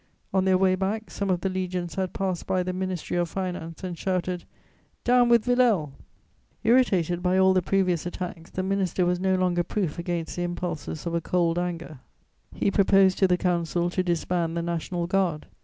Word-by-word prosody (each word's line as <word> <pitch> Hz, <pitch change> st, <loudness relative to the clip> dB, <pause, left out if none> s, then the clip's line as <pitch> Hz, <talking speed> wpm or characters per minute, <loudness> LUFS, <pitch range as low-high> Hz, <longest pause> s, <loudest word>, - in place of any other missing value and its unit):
On 190 Hz, -1 st, +2 dB
their 190 Hz, -1 st, +4 dB
way 185 Hz, 0 st, +3 dB
back, 200 Hz, +4 st, -2 dB
some 200 Hz, -1 st, -3 dB
of 180 Hz, -1 st, +1 dB
the 190 Hz, -, 0 dB
legions 180 Hz, -2 st, -3 dB
had 190 Hz, -1 st, -2 dB
passed 190 Hz, -3 st, -3 dB
by 185 Hz, -1 st, +1 dB
the 185 Hz, 0 st, -3 dB
Ministry 185 Hz, -2 st, -3 dB
of 175 Hz, -1 st, 0 dB
Finance 180 Hz, -2 st, -5 dB
and 180 Hz, -2 st, -4 dB
shouted: 180 Hz, 0 st, -2 dB, 0.6 s
"Down 245 Hz, 0 st, +4 dB
with 235 Hz, -2 st, +5 dB
Villèle!" -, -, -22 dB
[Sidenote: 245 Hz, -3 st, +4 dB
The 150 Hz, -4 st, -9 dB
National -, -, -32 dB
Guard.] -, -, -40 dB
Irritated 180 Hz, -9 st, +2 dB
by 180 Hz, +1 st, +2 dB
all 190 Hz, 0 st, +5 dB
the 185 Hz, -, +3 dB
previous 180 Hz, -2 st, +1 dB
attacks, 175 Hz, -2 st, -6 dB
the 185 Hz, -, -3 dB
minister 190 Hz, -1 st, 0 dB
was 180 Hz, 0 st, +1 dB
no 190 Hz, 0 st, +2 dB
longer 180 Hz, -1 st, +1 dB
proof 180 Hz, -4 st, -2 dB
against 170 Hz, -1 st, -3 dB
the -, -, -1 dB
impulses 175 Hz, -3 st, -4 dB
of 170 Hz, -, -2 dB
a 170 Hz, -, 0 dB
cold 170 Hz, 0 st, +1 dB
anger; 170 Hz, -4 st, -4 dB, 0.5 s
he 200 Hz, -, 0 dB
proposed 195 Hz, -1 st, +4 dB
to 190 Hz, -, +5 dB
the 180 Hz, -1 st, +2 dB
Council 175 Hz, -1 st, 0 dB
to 185 Hz, -, 0 dB
disband 170 Hz, -1 st, -1 dB
the 170 Hz, -, -1 dB
National 170 Hz, +1 st, -2 dB
Guard. 175 Hz, -4 st, 0 dB
180 Hz, 205 wpm, -26 LUFS, 175-190 Hz, 0.6 s, with